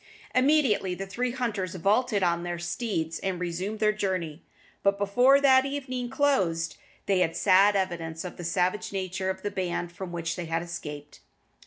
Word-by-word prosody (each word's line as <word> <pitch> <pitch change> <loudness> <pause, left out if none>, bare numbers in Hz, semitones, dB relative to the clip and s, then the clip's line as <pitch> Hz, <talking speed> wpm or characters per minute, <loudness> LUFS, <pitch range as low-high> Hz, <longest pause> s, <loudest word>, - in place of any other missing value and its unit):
Immediately 255 -9 +3
the 195 - -5
three 245 +6 -2
hunters 220 -8 -3
vaulted 205 +3 +2
on 170 -1 +2
their 175 0 -3
steeds 170 -2 -3
and 190 -2 -2
resumed 180 +4 -3
their 215 0 +3
journey; 185 -6 -3 0.4
but 200 0 +2
before 245 +8 +4
that 265 -2 +6
evening 260 -3 -4
closed 190 - +1 0.3
they 195 -2 +2
had 165 -2 +1
sad 200 +2 +5
evidence 170 -3 -2
of 180 - -6
the 175 - -7
savage 180 +4 0
nature 190 -1 -2
of 190 0 -4
the 205 - -2
band 175 -2 -2
from 180 +1 -7
which 170 -1 -3
they 175 - -4
had 165 +1 -1
escaped. 150 -4 -8
190 Hz, 170 wpm, -27 LUFS, 175-220 Hz, 0.4 s, that